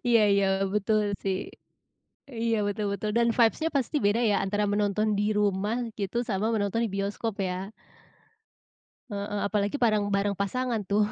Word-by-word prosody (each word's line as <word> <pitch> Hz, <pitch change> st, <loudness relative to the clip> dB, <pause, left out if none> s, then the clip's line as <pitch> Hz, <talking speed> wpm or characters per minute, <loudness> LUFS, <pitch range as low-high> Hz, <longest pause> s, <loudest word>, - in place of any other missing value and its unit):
Iya 230 Hz, -1 st, +5 dB
iya 200 Hz, 0 st, +3 dB, 0.3 s
betul 215 Hz, +1 st, +2 dB, 0.2 s
sih. 190 Hz, -1 st, 0 dB, 1.0 s
Iya 230 Hz, -1 st, +2 dB
betul 205 Hz, +1 st, -2 dB
betul 210 Hz, +1 st, -2 dB
dan 235 Hz, 0 st, +3 dB
vibes-nya 245 Hz, +8 st, +3 dB
pasti 275 Hz, +3 st, 0 dB
beda 210 Hz, +3 st, +2 dB
ya -, -, +3 dB
antara 205 Hz, +2 st, 0 dB
menonton 210 Hz, +1 st, +1 dB
di -, -, +2 dB, 0.2 s
rumah 205 Hz, +2 st, +1 dB, 0.2 s
gitu 200 Hz, +3 st, -3 dB
sama 205 Hz, +1 st, 0 dB
menonton 205 Hz, +2 st, 0 dB
bioskop 200 Hz, +2 st, -2 dB
ya. 185 Hz, +2 st, -4 dB, 1.4 s
Heeh, 205 Hz, 0 st, -3 dB
apalagi 205 Hz, +4 st, 0 dB
bareng, 215 Hz, -2 st, +3 dB
bareng 200 Hz, 0 st, +1 dB
pasangan 235 Hz, +3 st, -1 dB
tuh. 210 Hz, +1 st, +3 dB
205 Hz, 145 wpm, -27 LUFS, 200-225 Hz, 1.4 s, Iya